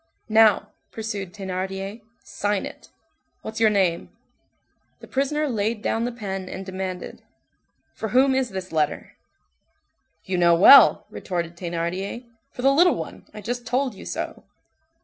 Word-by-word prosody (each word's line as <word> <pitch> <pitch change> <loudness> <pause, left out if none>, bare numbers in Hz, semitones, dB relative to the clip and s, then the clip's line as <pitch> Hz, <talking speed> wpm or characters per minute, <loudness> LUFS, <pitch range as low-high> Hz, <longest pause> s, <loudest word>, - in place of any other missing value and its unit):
"Now," 215 -1 +4 0.2
pursued 205 -4 -5
Thénardier, 195 +2 -5 0.2
"sign 205 -1 -2
it. - - -11 0.5
What's 220 0 -6
your 225 -1 +5
name?" 190 -5 0 0.9
The - - -11
prisoner 295 +3 -1
laid 220 -2 -2
down 225 +1 0
the 245 - -2
pen 195 -5 -5
and 190 +1 -7
demanded:— 185 -1 -6 0.7
"For 220 +11 -5
whom 265 +4 +4
is 260 -2 0
this 190 -1 -6
letter?" 155 -2 -1 1.1
"You 185 -1 -1
know 170 -1 +5
well," 235 +11 +8
retorted 170 -2 -4
Thénardier, 175 +6 -4 0.2
"for 250 - -8
the 275 +1 +5
little 350 +5 +5
one - - -8
I 210 - -9
just 240 +3 -4
told 255 +1 0
you 195 - -12
so." - - -5
205 Hz, 140 wpm, -24 LUFS, 185-235 Hz, 1.1 s, well